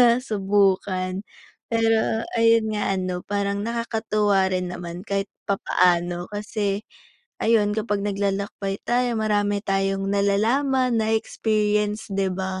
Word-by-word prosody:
nasubukan. 195 -5 +2 0.5
Pero 225 0 +2 0.2
ayun 230 -1 +4
nga 210 -2 0
ano 185 -1 -3
parang 200 0 -1
nakakatuwa 220 -4 +1
rin 180 -1 -1
naman 175 -1 -6
kahit 200 -2 -2 0.2
papaano 175 -2 +1
kasi 205 0 -2 0.6
ayun 215 -2 +3
kapag 210 -2 -1
naglalakbay 200 0 -2
tayo 240 -1 +1
marami 205 -1 +1
tayong 195 0 0
nalalaman 235 +6 +2
na-e-experience 215 -1 0
'di 195 -1 0
ba. 190 0 -3
205 Hz, 105 wpm, -23 LUFS, 195-220 Hz, 0.6 s, ayun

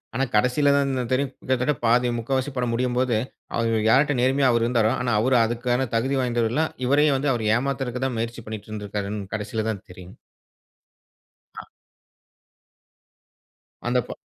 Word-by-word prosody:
ஆனா 135 +3 +1
கடைசில 125 +6 +3
தான் 140 -1 +1 0.2
தெரியும். 135 +1 0
கிட்டத்தட்ட 130 +3 0
பாதி 120 +2 +3
முக்காவாசி 130 +4 -1
படம் 120 -2 0
முடியும்போது, 125 -1 +1 0.4
அவர் 115 -1 +1
யார்ட்ட 140 +4 +4
நேர்மையா 135 +1 +3
அவரு 115 -1 +2
இருந்தாரோ! 115 -2 +2
ஆனா 120 -2 0
அவரு 130 +1 +3
அதுக்கான 120 +2 -1
தகுதி 130 +4 +1
வாய்ந்தவரு 120 -2 0
இல்ல. 155 +5 +2 0.2
இவரையும் 145 0 +3
வந்து 140 +1 0
அவரு 110 -2 -2
ஏமாத்துறதுக்குதான் 130 -1 -2
முயற்சி 115 +1 -4
பண்ணிட்டு 110 -1 -7
இருந்திருக்காருன்னு 105 -1 -5
கடைசில 110 +1 -3
தான் 100 -3 -4
தெரியும்." 90 0 -12 1.4
அ. - - -8 2.2
"அந்த 125 +1 +2
ப - - -7
125 Hz, 140 wpm, -24 LUFS, 115-130 Hz, 2.2 s, யார்ட்ட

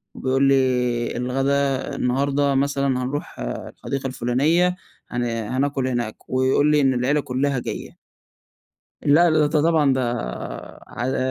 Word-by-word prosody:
بيقول 135 +1 0
لي 125 -3 +2
الغدا 135 +2 0
النهارده 140 +2 +1
مثلًا 140 0 +1 0.2
هنروح 145 +3 -5
الحديقة 135 - -5
الفلانية 140 +8 +1 0.3
هن 120 0 -2
هناكل 130 +4 -1
هناك، 120 -4 -4
ويقول 130 +3 +2
لي 150 -1 +4
إن 135 -1 +3
العيلة 130 +4 +1
كلّها 135 0 -1
جاية. - - -6 1.1
لأ 165 +4 +5
د 155 - +2 0.2
ده 150 - +4
طبعًا 160 -4 +3
ده 130 - 0 0.9
على 125 +2 -3
135 Hz, 120 wpm, -22 LUFS, 125-140 Hz, 1.1 s, لأ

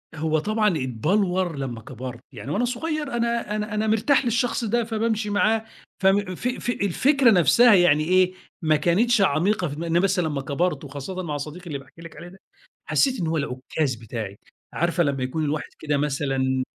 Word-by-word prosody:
هو 155 0 0
طبعًا 215 +4 +1 0.2
اتّبلوَر 180 - 0
لمّا 125 -5 -5
كَبَرت، 125 +1 -8
يعني 140 - -7
وأنا 240 +8 +1
صُغير 300 +3 -3
أنا 235 -2 -1
أنا 215 +1 -3
أنا 215 +1 0
مرتاح 225 +6 +2
للشخص 240 +1 0
ده، 235 +2 +1
فبامشي 220 -1 -1
معاه، 220 +2 +1 0.3
فم 195 -1 +2
ف 240 - -3
ف 250 -1 -3
الفكرة 245 - +3
نفسها 205 - +6
يعني 165 -5 +5
إيه، 185 +2 +3 0.3
ما 155 -2 +3
كانتش 200 +9 +2
عميقة 185 +2 +2
في 145 - -6
دماغ 170 +3 -5
إن 165 +1 +3
بس 195 0 +1
لمّا 155 -5 -1
كَبَرت، 160 +6 -1
وخاصَّةً 145 +7 -6
مع 150 -3 -3
صديقي 155 +5 -8
اللي 145 - -3
باحكي 140 +4 -17
لِك 165 - -11
عليه 175 - -9
ده، 190 +2 -15 0.5
حَسّيت 265 -3 +1
إن 170 - -1
هو 160 0 0
العُكَّاز 130 0 -2
بتاعي، 110 -3 -6 0.4
عارفة 170 +1 +1
لمّا 140 -4 -1
يكون 155 +5 -2
الواحد 150 +1 -2
كده 150 -2 -1
مثلًا، 135 -2 0
175 Hz, 180 wpm, -24 LUFS, 145-215 Hz, 0.5 s, نفسها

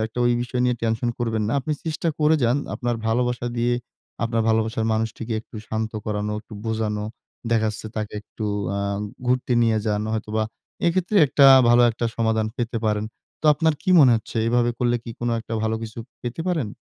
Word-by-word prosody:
একটা 110 +2 -9
ঐ - - +4 0.2
বিষয় 125 +1 -3
নিয়ে 125 -1 +1
টেনশন 115 +1 0
করবেন 115 -2 -1
না। - - -1
আপনি 145 +4 -2
চেষ্টা 160 +1 -2
করে 155 +1 +4
যান 120 +3 +3 0.2
আপনার 120 -1 -1
ভালোবাসা 120 +1 0
দিয়ে 120 +1 +2 0.5
আপনার 115 -1 0
ভালোবাসার 110 0 +1
মানুষটিকে 110 +1 -2
একটু 110 - -13
শান্ত 110 0 -2
করানো, 105 0 -2
একটু 110 0 -13
বোঝানো। 110 -2 -1 0.5
দেখা 110 -1 +3
যাচ্ছে, 110 +1 -8
তাকে 105 -1 -3
একটু 110 - -7 0.3
আ - - -1 0.5
ঘুরতে 125 0 +1
নিয়ে 115 -1 +3
যান 105 0 0
হয়তোবা 110 0 -1 0.4
এক্ষেত্রে 185 +4 +1
একটা 140 +1 +5 0.2
ভালো 120 +1 +6
একটা 115 +1 -4
সমাধান 110 -1 +1
পেতে 120 -1 -2
পারেন। 105 0 0 0.4
তো - - -23
আপনার 160 0 +2
কি 185 - 0
মনে 130 -4 +7
হচ্ছে, 110 - -7
এভাবে 120 0 +2
করলে 120 -1 +2
কি 115 - -6
কোনো 120 0 0
একটা 115 0 -6
ভালো 110 0 0
কিছু 110 +1 -7 0.2
পেতে 120 +5 -4
পারেন? 155 -11 0
115 Hz, 185 wpm, -23 LUFS, 110-125 Hz, 0.5 s, মনে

